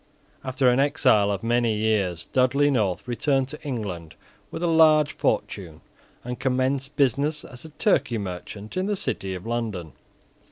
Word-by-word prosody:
After 130 0 0
an 125 +1 +4
exile 130 -8 +3
of 100 0 -2
many 120 -1 +1
years, 100 -6 0
Dudley 140 +3 +3
North 105 -6 0
returned 135 +2 0
to 150 - -9
England 100 - -5 0.3
with 170 - -6
a - - +2
large 155 -2 +5
fortune, - - -2 0.4
and 125 0 -5
commenced 135 +2 -1
business 145 +3 +1
as 125 +4 -11
a - - -9
Turkey 140 - +1
merchant 100 +2 -7
in 185 +1 -1
the 205 - 0
City 95 - -3
of 90 +2 -9
London. 110 - -3
125 Hz, 155 wpm, -24 LUFS, 105-145 Hz, 0.4 s, large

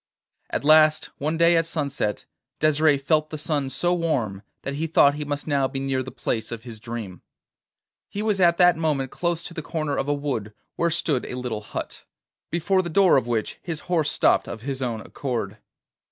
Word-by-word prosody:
At - - -2
last 155 0 +5
one 155 +3 -1
day 170 +1 +5
at 165 0 +2
sunset 140 -10 -2 0.3
Desire 155 -1 +4
felt 155 +3 +1
the 155 - -5
sun 145 -3 -1
so 175 +7 +1
warm, 125 - -1 0.2
that 140 - -3
he 155 +3 -2
thought 145 -2 +5
he 150 +1 -4
must 145 0 -3
now 140 -3 +1
be 135 - -5
near 135 -1 -1
the 130 - -6
place 120 -3 -3
of 115 -1 -6
his 115 -3 -9
dream. 110 -6 -7 0.9
He 205 - -4
was 210 -3 +1
at 170 -1 +5
that 180 -1 +6
moment 145 -5 0
close 170 -1 -1
to - - -8
the 165 - -4
corner 155 -2 -2
of 140 - -1
a 145 - +2
wood 125 -8 -3 0.2
where 170 - +1
stood 155 -5 0
a - - -5
little 120 -4 -3
hut, - - -6 0.5
before 185 +3 +1
the 175 - -5
door 190 +2 +5
of 130 -3 +2
which 115 -3 -2
his 165 -3 -4
horse 165 -4 0
stopped - - +3
of 110 - -6
his 135 +1 -4
own 115 -4 -2
accord. 115 -6 -4
145 Hz, 200 wpm, -24 LUFS, 125-165 Hz, 0.9 s, that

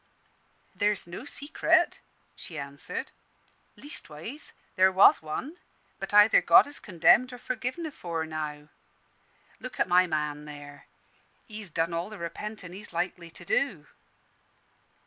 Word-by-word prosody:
"There's 205 0 0
no 175 +9 -8
secret," 285 +1 +3 0.4
she 165 - -9
answered. 140 0 -6 0.6
"Leastways, 240 - -6 0.2
there 190 0 +5
was 190 +1 +6
one, 260 - -6 0.4
but - - -6
either 210 +1 +7
God - - +7
has 285 0 -5
condemned 210 +7 +3
or 250 - -8
forgiven 255 +7 -4
afore 170 - -4
now. 150 -1 -6 0.9
Look 255 - -9
at - - +2
my 180 +1 +4
man 150 -2 -3
there; 145 -1 -11 0.6
he's 215 -3 -9
done 165 +1 -1
all 170 +4 -3
the 215 - -9
repentin' 180 +2 -7
he's 205 +3 -10
likely 175 0 -3
to 175 - -13
do." 185 - 0
180 Hz, 125 wpm, -28 LUFS, 155-220 Hz, 0.9 s, either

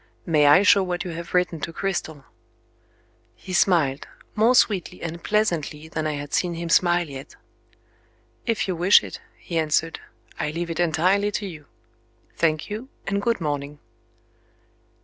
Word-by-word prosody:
May 150 -4 +3
I 150 +7 +7
show 200 -1 +6
what 180 -2 -2
you 180 - -5
have 170 +2 -6
written 180 -2 +1
to 165 - -4
Cristel?" 160 -6 -4 1.1
He 185 - -9
smiled, 160 -7 +2 0.3
more 225 +4 +3
sweetly 200 -7 +2
and 165 0 -6
pleasantly 170 -8 -1
than 160 -1 -3
I 155 - -1
had 145 -1 -6
seen 175 -2 0
him 170 0 -5
smile 175 0 +3
yet. 135 -1 -10 1.1
"If 225 -4 0
you 185 - -1
wish 180 +4 +5
it," - - -8 0.2
he 165 -2 -3
answered. 160 +1 0 0.4
"I - - -1
leave 170 +2 -4
it 165 - -5
entirely 180 +5 +2
to 205 - -2
you. 155 -7 -9 0.7
Thank 155 -2 0
you 220 +6 -6 0.2
and 200 +1 -1
good 230 +1 0
morning." 145 -2 -3
170 Hz, 155 wpm, -23 LUFS, 155-190 Hz, 1.1 s, I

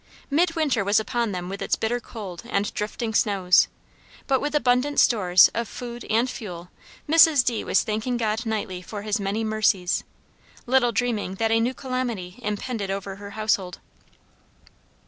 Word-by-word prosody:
Midwinter 310 - +1
was 200 +2 +3
upon 230 0 -1
them 180 -2 -4
with 195 +2 -6
its - - +1
bitter 235 +2 -1
cold 200 -7 -8
and 200 -3 -1
drifting 220 +2 -3
snows; 195 -5 +3 0.6
but 265 -2 +1
with 295 +1 -2
abundant 265 +1 +2
stores 185 -6 +5
of 235 -1 -2
food 240 -1 -8
and 230 +3 +2
fuel, 180 -8 -8 0.4
Mrs. 310 -3 +6
D. 235 -3 0
was - - +2
thanking 220 +3 -2
God 220 -1 -1
nightly 210 -5 -3
for 205 +2 -7
his 210 +1 -1
many 200 +3 -2
mercies, 215 -4 +1 0.6
little 250 -1 +3
dreaming 225 -5 -1
that 225 +2 0
a 225 - +4
new 245 +3 0
calamity 245 -8 -4
impended 210 -1 -3
over 195 0 -4
her 200 0 -9
household. 200 -4 0
220 Hz, 155 wpm, -24 LUFS, 200-245 Hz, 0.6 s, Mrs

